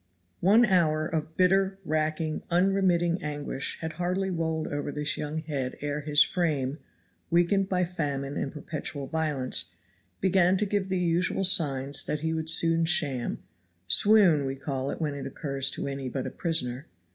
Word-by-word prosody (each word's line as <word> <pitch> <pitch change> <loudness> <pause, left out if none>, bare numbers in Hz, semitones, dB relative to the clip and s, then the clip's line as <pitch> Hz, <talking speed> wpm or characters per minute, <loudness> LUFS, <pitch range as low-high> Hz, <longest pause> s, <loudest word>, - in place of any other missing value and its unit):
One 215 +7 +5
hour 160 -6 +2
of 160 0 -4
bitter, 190 +1 +3
racking, 155 0 -1
unremitting 180 -1 +2
anguish 145 -2 -4
had 160 -1 -4
hardly 180 +3 -2
rolled 160 -2 -2
over 145 0 -3
this 150 +1 -1
young 150 +1 -4
head 140 -5 -3
ere 145 +1 -3
his 150 0 +4
frame, 150 -5 -1 0.5
weakened 175 +3 +2
by 180 -1 +1
famine 145 -5 -3
and 135 - -3
perpetual 150 -2 -5
violence, 145 - -1 0.5
began 190 0 +3
to 210 - +1
give 200 -1 -1
the 190 - 0
usual 180 +2 0
signs 140 -7 +2
that 150 - -3
he 160 0 -1
would 160 0 -2
soon 165 0 +5
sham 145 -7 -1 0.4
swoon 180 - +5
we 135 - -3
call 135 -1 -4
it - - -5
when 155 -3 -1
it 140 -1 -6
occurs 135 -1 0
to - - -4
any 135 -1 -4
but 130 0 -4
a - - -4
prisoner. 140 -6 -2
160 Hz, 160 wpm, -27 LUFS, 145-180 Hz, 0.5 s, One